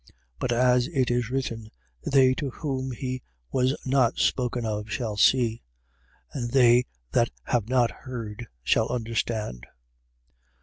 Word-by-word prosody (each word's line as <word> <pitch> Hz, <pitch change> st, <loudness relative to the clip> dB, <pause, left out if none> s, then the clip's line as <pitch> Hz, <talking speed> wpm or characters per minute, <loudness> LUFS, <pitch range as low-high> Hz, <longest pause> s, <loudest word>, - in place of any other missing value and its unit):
15:21. 60 Hz, -, -24 dB, 0.3 s
But 125 Hz, -, -1 dB
as 125 Hz, +1 st, +3 dB
it 130 Hz, -3 st, 0 dB
is 120 Hz, -1 st, 0 dB
written: 115 Hz, -4 st, -3 dB, 0.3 s
They 130 Hz, -2 st, +4 dB
to 140 Hz, +1 st, -3 dB
whom 130 Hz, -1 st, -3 dB
he 130 Hz, +1 st, -4 dB, 0.3 s
was 130 Hz, +2 st, +1 dB
not 130 Hz, -3 st, +2 dB
spoken 125 Hz, -2 st, 0 dB
of 105 Hz, 0 st, -3 dB
shall 110 Hz, -1 st, -2 dB
see: 115 Hz, +1 st, +3 dB, 0.7 s
and 120 Hz, -4 st, -3 dB
they 125 Hz, -1 st, +5 dB, 0.3 s
that 120 Hz, -1 st, +3 dB
have 120 Hz, -3 st, -1 dB
not 125 Hz, -2 st, +3 dB
heard 120 Hz, -3 st, -7 dB, 0.2 s
shall 65 Hz, -, +2 dB
understand. 110 Hz, -, -2 dB
120 Hz, 135 wpm, -26 LUFS, 115-130 Hz, 0.7 s, they